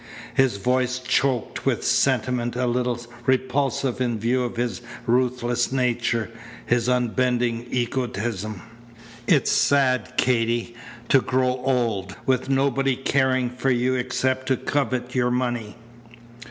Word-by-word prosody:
His 130 -6 +2
voice 125 +4 +1
choked 125 -1 0
with - - +1
a - - -9
sentiment 120 -1 +1
a 125 0 0
little 125 0 0 0.3
repulsive 130 0 0
in 120 -2 0
view 120 +4 +1
of 120 -1 -4
his 120 0 -2 0.2
ruthless 120 0 +1
nature, 120 -3 0 0.3
his 120 0 +1
unbending 125 -1 0
egotism. 115 -5 -2 0.6
"It's 145 0 +3
sad, 130 -4 +2
Katy, 120 -1 +1 0.4
to 135 - +5
grow 130 0 +1
old 115 -7 0
with 130 0 +1
nobody 135 -1 +2
caring 130 -1 +1
for 125 +2 -1
you 125 0 +2
except 130 +1 -1
to 130 -1 +2
covet 130 -3 -2
your 125 -1 +2
money." 120 -3 -2
125 Hz, 125 wpm, -23 LUFS, 120-130 Hz, 0.6 s, to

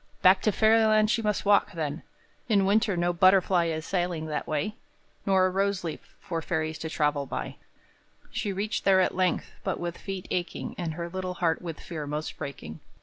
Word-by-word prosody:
Back 185 +1 +6
to 215 - +2
Fairyland 220 0 +4
she 235 - +1
must 210 -2 -1
walk, 205 0 +4
then; 155 -1 -3 0.5
In 200 -3 +4
winter 205 -1 +2
no 175 0 +1
butterfly 185 0 +4
Is 160 -1 -3
sailing 175 -4 -1
that 155 -1 -3
way, 155 +6 -1 0.5
nor 190 -1 +4
a - - +3
rose 195 0 0
leaf, 165 -2 -7
For 165 -4 -4
fairies 160 -1 -2
to 160 - -4
travel 150 -3 0
by; - - -5 0.7
She 205 - -2
reached 205 +3 -2
there 190 -1 +5
at 185 - +2
length, 185 -1 0
but - - -2
with 175 -1 -4
feet 195 -2 -6
aching 175 -1 -3
And 165 -3 -4
her 170 0 -4
little 185 +1 -4
heart 165 -2 0
with 165 -3 -6
fear 155 -3 -6
most 150 +2 -4
breaking. 80 - -7
180 Hz, 190 wpm, -27 LUFS, 160-195 Hz, 0.7 s, Back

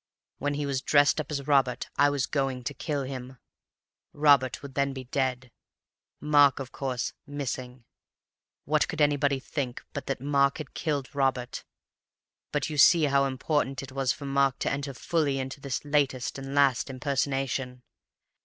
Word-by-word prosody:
When 145 0 -1
he 145 0 -2
was 135 -2 -1
dressed 145 +2 +4
up 150 - -10
as 140 -3 -3
Robert, 135 -4 +2
I 145 - +5
was 140 -2 0
going 135 -3 -2
to 120 - -3
kill 145 -3 -3
him. 130 -1 -7 0.8
Robert 140 -4 +3
would 140 -1 -8
then 140 0 0
be 130 -1 -6
dead, 130 -1 -2 0.7
Mark 145 -2 +5
(of 135 -2 -6
course) 130 -3 -3
missing. 130 -3 -5 0.8
What 150 +2 +2
could 155 - -5
anybody 145 -2 +2
think 130 -2 -4
but 140 - -5
that 135 - -2
Mark 140 0 +2
had 155 -4 -8
killed 145 -5 -2
Robert? 130 -3 -1 0.9
But - - 0
you 150 -2 -3
see 165 +2 +7
how 140 -1 +3
important 135 0 -1
it 135 - -9
was 135 -1 0
for 145 - -6
Mark 135 -1 +2
to - - 0
enter 140 0 -3
fully 150 -2 0
into 135 +1 -5
his 140 0 -3
latest 140 -3 0
(and 135 +1 -6
last) 140 -2 +3
impersonation. 135 -1 -2
140 Hz, 165 wpm, -28 LUFS, 130-145 Hz, 0.9 s, see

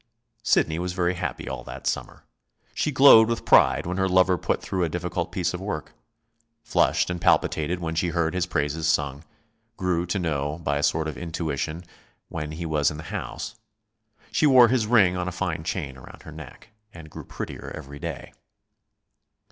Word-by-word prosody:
Sidney 80 -8 +2
was 90 0 -3
very 90 0 +1
happy 90 - -4
all 65 0 -5
that - - -9
summer. - - -3 0.5
She - - 0
glowed 130 -5 +8
with 115 - -2
pride - - +5
when 90 +2 -3
her 95 0 +1
lover 95 0 +4
put 85 - -1
through 95 -2 -2
a 85 - 0
difficult 90 +1 -3
piece 90 -1 -1
of 90 - -5
work; 85 -7 -5 0.7
flushed 115 -5 +2
and 90 -1 -4
palpitated 80 +3 +2
when 80 -2 -3
she 85 +2 0
heard 85 -1 0
his 90 -1 -1
praises 80 -1 -1
sung; 70 -1 0 0.5
grew 90 -2 0
to 85 - -1
know, 75 -4 -2
by 70 -1 0
a - - -1
sort 80 +1 +1
of 75 -5 -6
intuition, 80 0 -3 0.5
when 75 -1 -5
he 85 +2 -5
was 75 -2 +2
in 75 - -7
the 75 - -8
house. 110 - -5 0.8
She 155 - +3
wore 125 -4 +7
his 120 -3 +1
ring 100 -6 +4
on 90 0 -2
a - - -2
fine 90 -3 -3
chain 70 -4 -4
around 65 - -13
her - - -10
neck, - - -12 0.2
and 80 -4 -12
grew - - -8
prettier - - -7
every 70 -1 -9
day. - - -6
85 Hz, 185 wpm, -25 LUFS, 75-90 Hz, 0.8 s, glowed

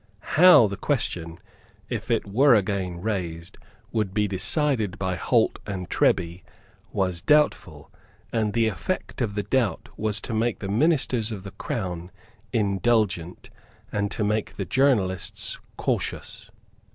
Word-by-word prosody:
How 180 -7 +8
the 100 -1 -3
question, 85 - -2 0.5
if - - -5
it - - +1
were 120 +6 +5
again 95 -4 -1
raised, 90 -5 -4 0.3
would 105 -4 -1
be 105 -1 +2
decided 110 - 0
by 95 -1 -1
Holt - - +1
and 90 -3 -5
Treby 85 0 +1 0.5
was 90 -3 -1
doubtful; 150 0 +1 0.4
and 110 -3 0
the 115 -1 +3
effect 110 - -3
of 105 -4 -1
the 105 - -1
doubt 120 -9 0
was 105 -1 0
to 115 - -5
make 115 +1 0
the 100 - -6
ministers 125 -2 +1
of 100 -4 -6
the 95 - -8
Crown 95 -5 -4 0.4
indulgent 100 -4 0 0.4
and 100 -2 -1
to 105 - -3
make 105 +1 -1
the - - -3
journalists 110 -10 +1 0.2
cautious. 110 -1 -3
105 Hz, 135 wpm, -25 LUFS, 95-115 Hz, 0.5 s, How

